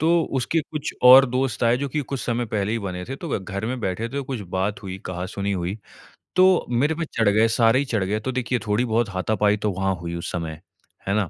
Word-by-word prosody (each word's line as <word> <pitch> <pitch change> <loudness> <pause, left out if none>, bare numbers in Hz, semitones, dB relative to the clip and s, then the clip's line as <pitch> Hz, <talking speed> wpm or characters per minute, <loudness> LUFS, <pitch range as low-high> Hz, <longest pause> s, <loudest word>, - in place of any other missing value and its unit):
तो 165 +2 +3 0.2
उसके 160 +6 0
कुछ 150 -2 -4
और 130 +2 +10
दोस्त 130 -1 -1
आए 115 +1 +4
जो 140 +2 -3
कि 150 +3 -2
कुछ 135 -2 -4
समय 120 0 -1
पहले 105 0 -1
ही 115 - 0
बने 90 -3 -5
थे 135 +2 -6
तो 170 - -7
व - - 0
घर 100 +2 -5
में 125 +1 -3
बैठे 110 +4 -2
थे 140 +3 -3
कुछ 130 -4 -5
बात 100 +3 -1
हुई, 95 -1 -6
कहा 90 0 -4
सुनी 100 +1 -3
हुई, 95 +3 -3 0.6
तो 185 -1 +5
मेरे 140 +6 +1
पे 165 0 -2
चढ़ 110 -3 +4
गए, 110 +2 +4
सारे 115 +2 +3
ही 140 - 0
चढ़ 110 -6 -1
गए 105 +3 -1
तो 130 +4 -3
देखिए 125 -1 -1
थोड़ी-बहुत 110 +1 +1
हाथापाई 105 +2 +1
तो 105 0 -1
वहाँ 95 +1 0
हुई 85 0 -4
उस 85 - -5
समय। 80 -2 -5 0.5
है 95 - +1
ना? 100 -6 0
110 Hz, 245 wpm, -23 LUFS, 100-130 Hz, 0.6 s, और